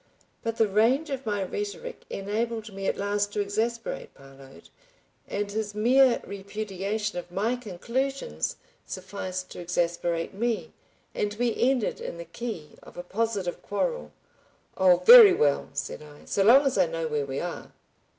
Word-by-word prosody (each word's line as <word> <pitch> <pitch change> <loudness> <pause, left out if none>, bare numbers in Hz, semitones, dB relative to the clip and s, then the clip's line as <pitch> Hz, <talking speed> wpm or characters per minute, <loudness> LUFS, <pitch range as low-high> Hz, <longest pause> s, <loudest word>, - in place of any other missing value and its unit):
But 230 0 -3
the 225 - +4
range 240 +10 +2
of 265 -3 -4
my 205 -2 0
rhetoric 205 - -5
enabled 220 +2 -3
me 195 0 -4
at - - 0
last 205 0 -1
to - - -2
exasperate 225 +3 -2
Parload, 135 0 -15 0.6
and 200 0 -3
his 210 -1 -3
mere 250 +4 +4
repudiation 200 0 -4
of 175 - -10
my 215 +7 0
conclusions 250 - -3 0.3
sufficed 185 -1 -6
to - - -8
exasperate 170 -1 -1
me, 210 -5 -2 0.4
and 210 0 -2
we 235 +1 0
ended 255 -2 +1
in - - -5
the 170 - -7
key 170 -3 -6
of - - -15
a 175 - -5
positive 200 -2 -2
quarrel. 180 - -2 0.6
"Oh, 185 -2 +4
very 460 -5 +11
well!" 145 -1 +1
said 140 - -4
I. 150 -1 -14
"So 200 - 0
long 250 +8 +7
as 265 -7 +1
I 180 - +4
know 165 0 -3
where 150 -2 -2
we 135 0 -3
are!" 175 -1 -6
205 Hz, 155 wpm, -27 LUFS, 175-230 Hz, 0.6 s, very